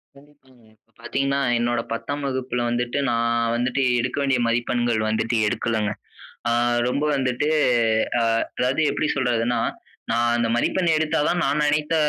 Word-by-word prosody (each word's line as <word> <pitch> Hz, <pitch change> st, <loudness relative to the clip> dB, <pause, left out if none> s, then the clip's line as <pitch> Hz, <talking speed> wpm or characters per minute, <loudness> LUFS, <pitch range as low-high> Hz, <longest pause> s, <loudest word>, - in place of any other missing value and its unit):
கண்டிப்பாங்க. 140 Hz, -3 st, -22 dB
இப்ப 115 Hz, +1 st, -41 dB
பாத்தீங்கன்னா, 140 Hz, 0 st, -1 dB, 0.2 s
என்னோட 120 Hz, 0 st, 0 dB
10ஆம் 145 Hz, +5 st, -4 dB
வகுப்புல 130 Hz, -2 st, -2 dB
வந்துட்டு, 120 Hz, +2 st, -1 dB
நா 120 Hz, -, +1 dB, 0.4 s
வந்துட்டு 125 Hz, +3 st, 0 dB, 0.2 s
எடுக்க 125 Hz, +3 st, -2 dB
வேண்டிய 135 Hz, -2 st, +1 dB
மதிப்பெண்கள் 120 Hz, -1 st, 0 dB
வந்துட்டு 110 Hz, +2 st, 0 dB
எடுக்கலங்க. 110 Hz, -1 st, -1 dB, 0.6 s
அ -, -, +1 dB, 0.4 s
ரொம்ப 140 Hz, +4 st, -1 dB
வந்துட்டு, 130 Hz, +2 st, 0 dB, 0.7 s
அ -, -, +1 dB, 0.4 s
அதாவது 130 Hz, +4 st, +1 dB
எப்பிடி 155 Hz, -, -1 dB
சொல்றதுன்னா, 120 Hz, -2 st, 0 dB, 0.5 s
நா 115 Hz, -, +1 dB, 0.2 s
அந்த 120 Hz, -1 st, +1 dB
மதிப்பெண் 175 Hz, +8 st, +1 dB
எடுத்தா 160 Hz, +1 st, 0 dB
தான் 175 Hz, 0 st, 0 dB
நான் 150 Hz, +2 st, +1 dB
நினைத்த 150 Hz, +2 st, +1 dB
125 Hz, 140 wpm, -23 LUFS, 120-140 Hz, 0.7 s, நா